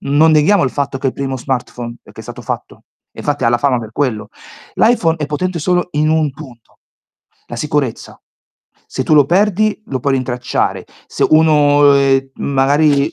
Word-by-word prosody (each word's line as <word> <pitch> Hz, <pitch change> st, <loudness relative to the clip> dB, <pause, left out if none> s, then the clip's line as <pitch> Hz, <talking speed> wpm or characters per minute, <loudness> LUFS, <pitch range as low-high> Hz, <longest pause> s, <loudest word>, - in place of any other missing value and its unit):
non 150 Hz, +3 st, +3 dB
neghiamo 155 Hz, +3 st, +3 dB
il 130 Hz, -, -1 dB
fatto 140 Hz, -1 st, -3 dB
che -, -, -17 dB
è -, -, +3 dB
il -, -, -17 dB
primo 135 Hz, -1 st, -3 dB
smartphone, 125 Hz, -2 st, -4 dB
uhm, 120 Hz, -, -9 dB, 0.2 s
che -, -, -11 dB
è -, -, -10 dB
stato -, -, -10 dB
fatto. -, -, -6 dB, 0.3 s
Infatti 145 Hz, -3 st, -3 dB
ha -, -, +4 dB
la 120 Hz, 0 st, +1 dB
fama 130 Hz, -2 st, +1 dB
per 110 Hz, -1 st, -9 dB
quello. 125 Hz, -7 st, -2 dB, 0.5 s
L'iPhone 215 Hz, -9 st, +2 dB
è 150 Hz, -3 st, -4 dB
potente 170 Hz, +4 st, -3 dB
solo 180 Hz, +3 st, 0 dB
in 150 Hz, +1 st, +1 dB
un 155 Hz, -2 st, +1 dB
punto. 130 Hz, -5 st, -15 dB, 0.7 s
La 120 Hz, -, -8 dB
sicurezza. 145 Hz, -3 st, -3 dB, 0.7 s
Se -, -, -4 dB
tu 155 Hz, -, +2 dB
lo 145 Hz, -2 st, +6 dB
perdi 210 Hz, +4 st, +1 dB
lo 130 Hz, -2 st, -4 dB
puoi 140 Hz, +2 st, 0 dB
rintracciare. 125 Hz, -1 st, -2 dB, 0.2 s
Se -, -, 0 dB
uno, 145 Hz, -2 st, +4 dB
ehm, 135 Hz, -1 st, +2 dB
magari 140 Hz, +1 st, +1 dB
145 Hz, 185 wpm, -16 LUFS, 130-155 Hz, 0.7 s, lo